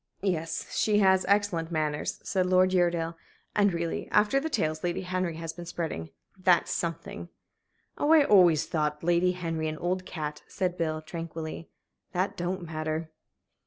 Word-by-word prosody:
"Yes, 165 -4 -2
she 210 -1 +3
has 190 -2 +4
excellent 200 -5 +2
manners," 155 -2 -1
said 185 -2 0
Uredale. 175 -3 +3 0.4
"And 205 -1 +4
really, 170 -1 -3
after 210 +6 +3
the 320 +3 -3
tales 155 - -1
Lady 175 +1 -1
Henry 180 -2 -2
has 165 0 -5
been 175 0 -9
spreading 160 - -4 0.3
that's 185 -2 +3
something!" 160 - -4 0.7
"Oh, 295 - +2
I 320 -2 +8
always 180 - +5
thought 150 -1 -1
Lady 175 +2 +3
Henry 165 -3 -2
an 155 0 -3
old 185 +2 -1
cat," 150 -2 -5
said 185 -3 -2
Bill, 155 -2 -2
tranquilly. 165 -1 -6 0.4
"That 185 +3 0
don't 180 +1 -3
matter." 155 0 -3
170 Hz, 150 wpm, -28 LUFS, 160-185 Hz, 0.7 s, I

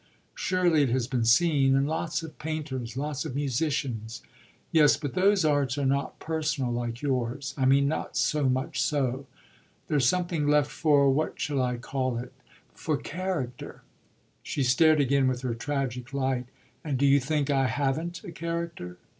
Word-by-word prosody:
"Surely 180 -4 +2
it 140 - +2
has 125 0 +1
been 125 -3 -1
seen 135 +2 +4
in 135 0 +2
lots 160 +2 -2
of 160 - -10
painters, 135 -7 -4
lots 145 0 -2
of 150 -5 -6
musicians." 135 -5 -2 0.5
"Yes, 155 -3 +5
but 145 -4 -5
those 190 -1 +3
arts 145 -3 +1
are 140 - 0
not 140 +1 0
personal 150 -5 -2
like 120 +1 -4
yours. 130 0 -2
I 135 - 0
mean 140 +1 +4
not 155 - -3
so 150 -3 +2
much 130 +2 -1
so. 135 -2 -1 0.6
There's 140 -5 +2
something 175 -4 0
left 150 -1 +3
for 145 -3 +3
what 155 +4 -1
shall 140 -3 -1
I 125 -1 -1
call 130 0 -2
it? 125 +2 -7 0.4
for 155 -3 -2
character." 160 -9 -5 0.6
She 140 - -2
stared 155 +5 +4
again 140 -1 +3
with 125 -1 -1
her 125 -2 -1
tragic 130 0 -3
light. 130 -2 -1 0.4
"And 145 -4 -1
do 140 - +2
you 140 0 +5
think 145 +1 -1
I 135 -1 +2
haven't 145 +7 -2
a - - -8
character?" 170 - -5
140 Hz, 165 wpm, -27 LUFS, 130-155 Hz, 0.6 s, Yes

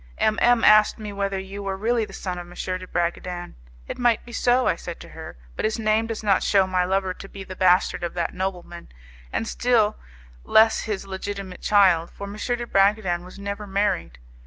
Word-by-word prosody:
M 215 0 +1
M 240 -1 +4
asked 215 0 +6
me 210 -2 -7
whether 200 -1 -2
you 195 +1 -6
were 195 -1 -3
really 225 +2 +1
the 205 - -14
son 180 -2 -5
of 175 - -9
M, 175 - -13 0.2
de 185 - -9
Bragadin. 175 0 -3 0.3
'It - - -6
might 240 -2 +2
be 240 - -11
so,' 245 +2 +2
I - - +2
said - - -8
to - - -11
her, - - -10 0.2
'but - - -4
his 215 +1 0
name 220 0 +1
does 225 -1 -5
not 200 -3 +3
shew 195 -2 +3
my 185 -1 +1
lover 190 0 0
to 195 - -11
be 195 - -8
the 185 0 -9
bastard 180 -1 +3
of 175 - -4
that 170 -1 -2
nobleman, 180 -2 -5 0.4
and 225 - -2
still 225 -4 +2 0.5
less 220 0 +5
his 210 -3 -3
legitimate 195 -1 -6
child, 185 -5 +4
for 200 - -8
M. 200 - -7
de 240 +3 -2
Bragadin 195 -4 +2
was 180 +2 -12
never 200 +1 -5
married. 195 - -1
200 Hz, 205 wpm, -24 LUFS, 185-215 Hz, 0.5 s, asked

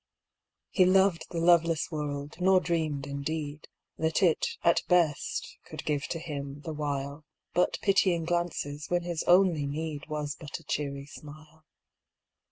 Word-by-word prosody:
He 185 - +5
loved 185 -2 +4
the 170 - -5
loveless 165 -1 +3
world, 145 -1 -4
nor 185 +1 +5
dreamed, 155 -6 -1
in 140 0 -5
deed. 150 0 -4 0.3
That 160 +3 +1
it, 170 -4 +2
at 170 -1 +4
best, 170 -5 +1
could - - -8
give 145 -2 -1
to 165 - -3
him, 145 -3 -6
the 160 +1 -5
while. 145 0 -3 0.3
But 180 - +2
pitying 185 -4 +3
glances, 165 -4 -2
when 175 0 +1
his 170 -2 -2
only 175 -5 +4
need 150 0 -4
Was 150 -2 -3
but 150 -2 -7
a 165 - -16
cheery 140 -1 -3
smile. 155 +1 -13
155 Hz, 150 wpm, -29 LUFS, 145-175 Hz, 0.3 s, He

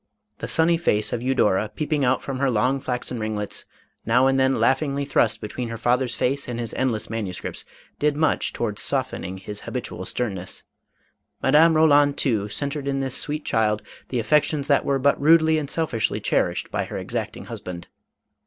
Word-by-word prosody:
The - - -4
sunny 165 +1 +3
face 105 -10 +1
of 120 - -2
Eudora 110 -5 +1
peeping 150 +1 -1
out 130 +1 +2
from 135 -2 -4
her 140 -1 +2
long 125 +4 +1
flaxen 125 -1 -3
ring 110 0 -2
lets, 105 -1 -3 0.4
now 125 +3 +3
and 135 0 +3
then 130 0 +2
laughingly 140 +1 +1
thrust 135 -5 +2
between 115 +3 -5
her 115 - -5
fa 120 +2 +3
ther's 125 -2 -2
face 140 +2 0
and 120 -1 -4
his 115 -2 -3
endless 120 -5 -1
manuscripts, 105 -5 -5 0.3
did 150 0 +2
much 155 -1 +2
towards 105 -3 -2
softening 130 -9 -1
his 100 +2 -7
habitual - - -5
sternness. 95 -7 -3 0.8
Madame 155 +4 +5
Roland 145 -2 +4
too, 105 -6 0
centred 140 +4 -3
in 135 0 0
this 135 -2 -1
sweet 150 +1 -1
child 110 -1 +1 0.3
the 125 - -2
affections 145 +4 +2
that 140 - +3
were 140 -1 +1
but 140 +2 +2
rudely 160 +1 +5
and 145 -2 -5
selfishly 135 -10 -1
cherished - - 0
by - - -1
her - - -6
exacting - - -4
husband. 90 -1 -7
130 Hz, 180 wpm, -23 LUFS, 110-145 Hz, 0.8 s, Madame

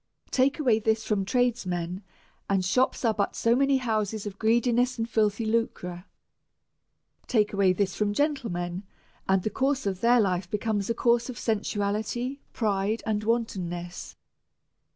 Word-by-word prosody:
Take 270 +2 +2
away 245 -8 +3
this 220 0 0
from 200 -3 0
tradesmen, 190 -7 -1 0.5
and 195 -2 +1
shops 250 +6 +1
are 225 - +3
but 200 -2 -1
so 230 +1 +2
many 275 +1 +3
houses 220 -4 -1
of 200 -1 -7
greediness 240 +3 +2
and 225 0 -1
filthy 220 -1 +1
lucre. 195 -5 -2 1.2
Take 215 -5 +2
away 195 -2 +4
this 190 +1 0
from 210 -1 0
gentlemen, 205 - -1 0.5
and 190 -1 +3
the 215 - -1
course 270 -1 0
of 190 -2 -2
their 240 +1 +5
life 185 -4 0
becomes 210 -1 -1
a 230 - +1
suurce 235 +1 +2
of 255 - -5
sensuaiiiy, 220 +4 -2
pride, 210 0 -1
and 215 -1 -1
wantonness. 175 - -3
215 Hz, 145 wpm, -27 LUFS, 195-240 Hz, 1.2 s, their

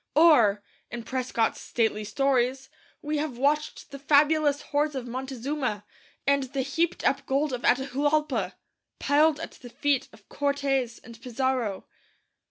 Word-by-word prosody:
Or, 240 -11 +5 0.3
in 240 -1 -6
Prescott's 250 -2 -1
stately 220 -2 0
stories, 260 +3 0 0.3
we 300 0 -1
have 290 -5 -3
watched 300 +4 -1
the 275 - -8
fabulous 290 +1 +3
hoards 295 0 0
of 260 -2 -4
Montezuma, 260 -2 -3 0.4
and 280 0 +3
the 265 +1 -3
heaped 325 +5 -1
up 275 0 +2
gold 275 +1 0
of 245 - -3
Atahuallpa, 285 +4 +1 0.4
piled 300 +2 +3
at 330 - -6
the 245 - -13
feet 285 +1 0
of 210 - -19
Cortes 275 -4 -1
and 230 -1 -13
Pizarro. 250 -5 -2
270 Hz, 135 wpm, -27 LUFS, 245-290 Hz, 0.4 s, Or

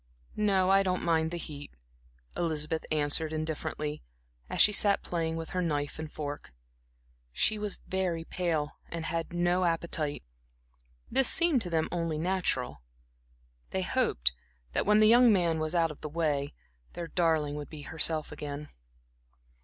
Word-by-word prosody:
"No, 195 -3 +3
I 195 0 +6
don't 185 -2 -1
mind 160 -1 +2
the 175 - -4
heat," 145 - -8 0.6
Elizabeth 160 -1 -1
answered 155 +1 0
indifferently, 155 -1 -3 0.5
as - - -3
she 210 - +8
sat 200 -1 +2
playing 165 -2 -2
with 165 0 -5
her 185 - -1
knife 145 -3 -2
and 155 -1 -6
fork. 145 - -6 0.8
She 215 - +2
was 210 -2 -1
very 180 -3 -1
pale 165 -4 -1 0.2
and 165 -1 -4
had 165 0 -3
no 175 +1 +1
appetite. 165 - -1 0.9
This 270 -2 +4
seemed 335 -7 +4
to 180 - -3
them 160 -2 +1
only 165 -2 -1
natural. 155 - -1 0.9
They - - -1
hoped 60 +1 +1 0.4
that - - -1
when 210 +1 +5
the 215 - +7
young 240 +1 +7
man 170 -5 +2
were 155 - -1
once 155 +3 -3
out 165 -2 +3
of 150 - -12
the 150 - -5
way, 145 -3 -1 0.4
their 170 -1 -5
darling 160 -4 +1
would 145 0 -6
be 150 -2 -9
herself 160 0 -1
again. 150 0 -6
165 Hz, 155 wpm, -30 LUFS, 150-180 Hz, 0.9 s, she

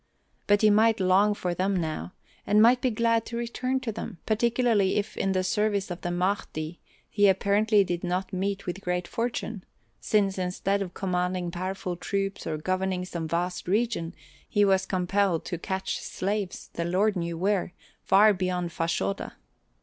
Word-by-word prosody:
But 205 +1 +4
he 215 - +7
might 220 +1 +4
long 195 +3 +4
for 180 -3 -2
them 190 +3 0
now, 160 +2 -4 0.3
and 210 +1 +4
might 240 +3 +6
be 255 - +2
glad 230 0 +2
to 235 - -5
return 255 +2 -1
to 230 - -3
them, 215 -2 -6
particularly 225 -3 +2
if 210 +1 -2
in 195 - 0
the 185 0 +1
service 200 0 0
of 175 - -6
the 175 - -3
Mahdi 175 -3 -2 0.3
he 205 -1 +3
apparently 200 +2 +3
did 175 -2 -3
not 180 +2 -2
meet 195 +1 -2
with 180 +2 -4
great 180 -1 -2
fortune, 230 -4 -3 0.4
since 200 -3 +1
instead 190 +2 -1
of 180 -3 -5
commanding 180 -2 -1
powerful 185 0 -4
troops 195 +2 -3
or 155 -1 -2
governing 185 +2 -1
some 170 -3 -4
vast 175 +3 -2
region 200 -4 0 0.3
he 205 0 +3
was 190 -1 +2
compelled 185 -1 +1
to 175 -2 -4
catch 190 +1 -3
slaves 200 0 -3
the 170 - -2
Lord 195 +5 +1
knew 170 -2 -3
where 190 0 0 0.3
far 210 +2 +5
beyond 180 -2 -2
Fashoda. 165 - -2
190 Hz, 165 wpm, -27 LUFS, 180-210 Hz, 0.4 s, he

